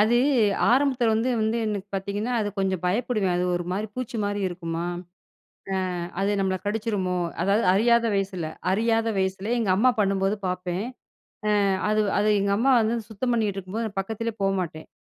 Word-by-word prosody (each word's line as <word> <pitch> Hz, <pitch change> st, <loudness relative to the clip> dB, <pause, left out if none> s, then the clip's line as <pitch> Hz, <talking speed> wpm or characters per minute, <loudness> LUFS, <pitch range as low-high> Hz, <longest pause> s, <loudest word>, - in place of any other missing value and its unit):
அது 225 Hz, +3 st, +4 dB, 0.6 s
ஆரம்பத்தில 255 Hz, -3 st, +3 dB
வந்து 230 Hz, +4 st, +1 dB
வந்து 220 Hz, +2 st, +1 dB
எனக்கு 200 Hz, -1 st, -3 dB
பாத்தீங்கன்னா, 200 Hz, +5 st, -2 dB
அது 205 Hz, -, -1 dB
கொஞ்சம் 190 Hz, -2 st, 0 dB
பயப்படுவேன். 205 Hz, -2 st, 0 dB
அது 180 Hz, -, 0 dB
ஒரு 175 Hz, -, -3 dB
மாரி, 205 Hz, +3 st, -2 dB
பூச்சி 250 Hz, -2 st, -4 dB
மாரி 205 Hz, 0 st, -1 dB
இருக்குமா? 170 Hz, -1 st, -4 dB, 1.1 s
அ -, -, -3 dB, 0.2 s
அது 205 Hz, +1 st, +1 dB
நம்மள 190 Hz, -1 st, +1 dB
கடிச்சிருமோ? 205 Hz, -4 st, -1 dB, 0.3 s
அதாவது 200 Hz, +4 st, +2 dB
அறியாத 235 Hz, +3 st, +4 dB
வயசுல, 195 Hz, -3 st, -1 dB, 0.3 s
அறியாத 225 Hz, +2 st, +2 dB
வயசுல, 190 Hz, +2 st, -1 dB
எங்க 220 Hz, -5 st, 0 dB
அம்மா 250 Hz, +5 st, +4 dB
பண்ணும்போது, 195 Hz, 0 st, +1 dB
பாப்பேன். 180 Hz, +2 st, -2 dB, 0.8 s
அ -, -, +2 dB, 0.2 s
அது 215 Hz, 0 st, +2 dB, 0.2 s
அது 210 Hz, +1 st, +2 dB
எங்க 200 Hz, 0 st, +1 dB
அம்மா 260 Hz, +4 st, +4 dB
வந்து 225 Hz, +2 st, +1 dB
சுத்தம் 245 Hz, +4 st, -2 dB
பண்ணிக்கிட்டு 210 Hz, -4 st, 0 dB
இருக்கும்போது 200 Hz, +2 st, -5 dB
பக்கத்திலேயே 220 Hz, +3 st, -3 dB
போமாட்டேன். 185 Hz, -5 st, -2 dB
205 Hz, 155 wpm, -25 LUFS, 190-225 Hz, 1.1 s, அது